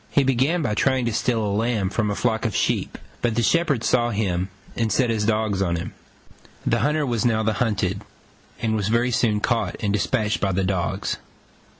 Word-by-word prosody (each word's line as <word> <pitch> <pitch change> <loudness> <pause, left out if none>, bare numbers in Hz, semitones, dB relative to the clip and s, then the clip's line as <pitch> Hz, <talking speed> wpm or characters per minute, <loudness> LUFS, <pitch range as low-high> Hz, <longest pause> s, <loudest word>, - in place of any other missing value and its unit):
He 140 - +3
began 135 +6 +2
by 105 - 0
trying 130 +2 +1
to 115 - -1
steal 115 -1 0
a 100 - -1
lamb 105 -3 0
from 105 0 0
a 100 - -1
flock 110 -1 0
of 115 - -1
sheep: - - 0 0.2
but 120 -2 0
the 120 - +1
shepherd 150 -5 +2
saw 120 -1 +2
him 95 -4 -1 0.3
and 115 -2 0
set 125 -3 +2
his 110 -2 0
dogs 110 -3 +1
on 85 -3 +1
him. 85 +1 -5 0.7
The - - +2
hunter 150 0 +1
was 120 -4 0
now 110 -3 +2
the 110 0 +1
hunted, 105 -4 0 0.6
and 110 -1 0
was 105 -2 -1
very 120 +3 +2
soon 110 -3 +1
caught 120 0 0
and 100 -2 -1
despatched 105 +1 0
by 95 -2 +1
the 95 +1 0
dogs. 95 -2 -1
110 Hz, 205 wpm, -23 LUFS, 105-120 Hz, 0.7 s, He